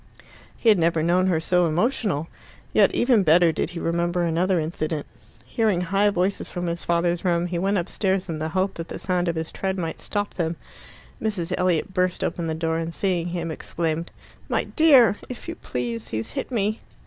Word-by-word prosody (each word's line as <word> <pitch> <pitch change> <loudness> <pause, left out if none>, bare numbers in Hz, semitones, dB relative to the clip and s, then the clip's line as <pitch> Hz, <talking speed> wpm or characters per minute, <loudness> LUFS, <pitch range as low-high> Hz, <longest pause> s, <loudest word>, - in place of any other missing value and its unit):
He - - -3
had 210 -4 +5
never 165 -1 +2
known 180 +3 +3
her 170 -4 +2
so 180 +1 +2
emotional. 175 - 0 0.5
Yet - - +5
even 240 -3 +4
better 170 0 +5
did 160 - -2
he 175 -1 -6
remember 170 +1 0
another 175 +2 +1
incident. 155 -1 -2 0.4
Hearing 200 - +1
high 195 +3 +2
voices 190 0 -1
from 175 -1 -4
his 170 0 -2
father's 170 0 +1
room, 175 -2 +1
he 175 -1 -2
went 195 +3 +1
upstairs 190 +1 -1
in 160 -3 -4
the 155 +1 -2
hope 185 +3 0
that 165 0 -6
the - - -6
sound 180 -1 -1
of 170 - 0
his 160 0 -3
tread 190 0 -2
might 165 -3 -3
stop 205 -1 -3
them. 170 -1 -1 0.7
Mrs. 185 -5 -2
Elliot 180 0 0
burst 180 -1 0
open 170 -2 -2
the 160 - -1
door, 160 0 -1
and 165 0 -3
seeing 180 -3 0
him, 170 -2 -3
exclaimed, 165 +1 -3 0.4
"My - - +1
dear! 265 - +5
If 250 - -8
you - - -3
please, 115 -2 -4
he's 110 +1 -4
hit - - -4
me." 215 -3 0
175 Hz, 195 wpm, -24 LUFS, 165-190 Hz, 0.7 s, had